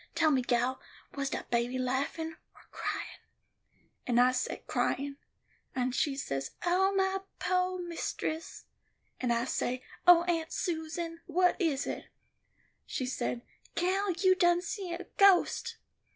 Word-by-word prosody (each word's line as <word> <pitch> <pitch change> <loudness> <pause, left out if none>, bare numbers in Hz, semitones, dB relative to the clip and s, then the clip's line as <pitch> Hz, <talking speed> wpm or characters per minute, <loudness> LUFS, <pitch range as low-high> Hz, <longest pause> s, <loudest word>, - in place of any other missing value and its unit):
Tell 325 -2 +4
me, 265 -3 +3
gal, 245 +1 0 0.3
was 275 -1 -2
dat - - -5
baby 240 +2 +1
laughin' 275 +6 -1 0.2
or - - -17
cryin'?' - - -4 0.9
and 240 -1 +3
I 250 +1 +6
say, 255 - -2
'Cryin';' 280 0 -1 0.6
and 255 -1 0
she 285 0 +1
say, 135 - -2 0.2
'Ooh, 380 +3 +3
my 385 0 +2 0.2
poo' 365 0 +1
mistess;' 325 -1 -4 0.6
and 250 -2 0
I 235 0 +1
said, 255 -1 -1 0.3
'Oh, 345 -1 +9
Aunt 330 -2 -1
Susan, 330 -1 -3
what 360 +2 +3
is 300 -6 +1
it?' - - -4 0.8
She 260 - -2
say: 245 -1 -2 0.3
'Gal, 380 +3 +1
you 370 +2 +4
done 350 -1 +3
see 390 -2 -4
a 345 +2 -4
ghost. 400 +4 +4
325 Hz, 135 wpm, -31 LUFS, 255-360 Hz, 0.9 s, Oh